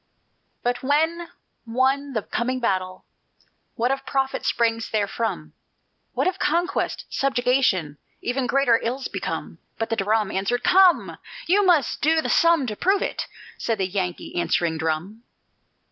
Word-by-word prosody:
"But 245 0 -1
when 320 +5 +1 0.3
won 265 +4 0
the 220 -4 -1
coming 255 +2 -2
battle, 185 -5 -2 0.7
What 245 +1 +1
of 270 - -2
profit 270 -1 -1
springs 230 -1 0
therefrom? 200 -6 -2 0.6
What - - 0
if 375 +1 -1
conquest, 350 +3 0
subjugation, 250 - +1 0.2
Even 250 +1 -2
greater 245 -3 +3
ills 255 +3 -2
become?" - - -5 0.2
But 225 - -3
the - - +2
drum 215 -1 +1
Answered: 200 +6 -1
"Come! 370 -2 +4 0.3
You 400 +4 +3
must 320 -8 +2
do 320 +2 +3
the - - -2
sum 335 -4 +4
to 215 -3 -4
prove 390 - +2
it," - - -3 0.3
said 225 -2 -1
the 190 - 0
Yankee 185 -2 -4
answering 170 -1 0
drum. 165 +8 -3
245 Hz, 140 wpm, -23 LUFS, 200-280 Hz, 0.7 s, Come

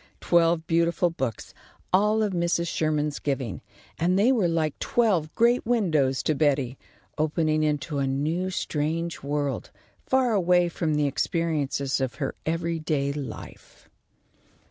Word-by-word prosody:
Twelve 170 -1 +2
beautiful 170 +1 +2
books, 130 -9 -4 0.4
all 210 +3 +3
of 205 -2 -1
Mrs. 170 0 0
Sherman's 150 -2 -1
giving, 135 -7 -3 0.4
and 180 +3 +2
they 220 +6 +4
were 220 -9 +2
like 160 -3 -1
twelve 190 -10 +1
great 235 +2 +3
windows 160 - +1
to 155 - +1
Betty, 140 -4 +1 0.4
opening 155 0 +1
into 150 -1 -1
a 135 - 0
new 155 +7 -1
strange 165 -1 -2
world, 145 0 -2 0.4
far 260 -3 +2
away 180 -3 +3
from 160 -2 -1
the 150 0 +2
experiences 145 -2 -1
of 130 -2 -2
her 140 -3 -3
every 165 0 -1
day 145 -3 -1
life. 145 -2 -9
160 Hz, 135 wpm, -26 LUFS, 145-175 Hz, 0.4 s, they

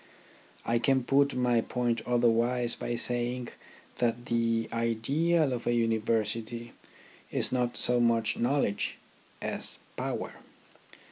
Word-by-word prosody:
I 115 0 +2
can 130 +1 +2
put 140 +1 +3
my 125 -2 +2
point 120 -1 -1
otherwise 120 0 +2
by 120 - -3
saying 120 +1 -1 0.5
that 120 0 0
the 115 -1 +1
ideal 135 +7 +1
of 120 -1 -4
a 120 - +3
University 115 +1 -1 0.6
is - - +2
not 125 -1 0
so 125 0 +2
much 115 -1 +2
knowledge, 125 -4 0 0.5
as - - -3 0.2
power. - - -3
120 Hz, 115 wpm, -29 LUFS, 115-125 Hz, 0.6 s, put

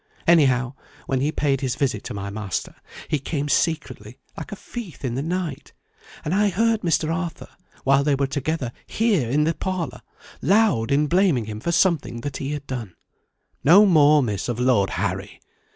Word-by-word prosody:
Anyhow, 130 -7 +4 0.3
when 130 -1 -1
he 145 +3 +1
paid 140 -4 0
his 130 -2 -1
visit 135 -2 -1
to 125 - -5
my 100 0 -5
master, 100 -3 -4 0.3
he 150 - 0
came 145 +1 -3
secretly 145 -7 -1 0.2
like - - -8
a - - -4
thief 200 - -8
in 120 - -2
the 130 - -2
night. 165 -2 -4 0.5
And 155 - -1
I 205 +1 +3
heard 225 +3 +1
Mr. 165 -2 +1
Arthur, 175 -2 -5 0.3
while 135 +1 +4
they 145 -1 +2
were 140 0 0
together 140 -1 -2 0.2
here 205 - +1
in 145 +4 +2
the 165 +2 +1
parlour, 185 -6 -4 0.4
loud 195 - +3
in 145 +2 +3
blaming 170 - +2
him 105 0 -6
for 170 - -2
something 170 -9 +1
that 145 +1 -4
he 140 +1 -4
had 145 -1 -5
done. 120 -9 -6 0.7
No 180 +9 +7
more, 150 -5 +5
Miss, 105 -2 -3
of 120 -1 -2
Lord 125 -6 +3
Harry! 95 +1 -3
145 Hz, 180 wpm, -23 LUFS, 125-170 Hz, 0.7 s, No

